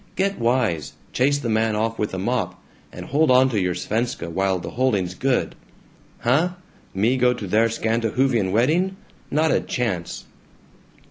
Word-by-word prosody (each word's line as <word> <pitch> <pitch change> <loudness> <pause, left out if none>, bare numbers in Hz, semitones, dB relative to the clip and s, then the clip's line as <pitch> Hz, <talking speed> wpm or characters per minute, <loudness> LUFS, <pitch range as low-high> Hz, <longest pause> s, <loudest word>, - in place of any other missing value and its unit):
Get 195 +1 0
wise! 115 - 0 0.2
Chase 140 +3 +2
the 140 - -4
man 110 -1 +1
off 115 +1 -1
with 105 - -1
a - - -3
mop, 95 -3 -2 0.3
and - - -8
hold 155 +3 +2
onto 130 -2 +4
your 90 -3 0
Svenska 110 -1 -2
while 95 +2 +1
the 85 - -7
holding's 105 -8 0
good. 130 +6 0 0.7
Huh? 155 +9 +2 0.4
Me 115 +7 +2
go 125 0 +3
to 105 - -6
their 110 +4 +3
Scandahoofian 115 -1 0
wedding? 165 - +2 0.3
Not 155 +2 +2
a - - +3
chance!" 95 -9 -3
115 Hz, 150 wpm, -22 LUFS, 100-130 Hz, 0.7 s, onto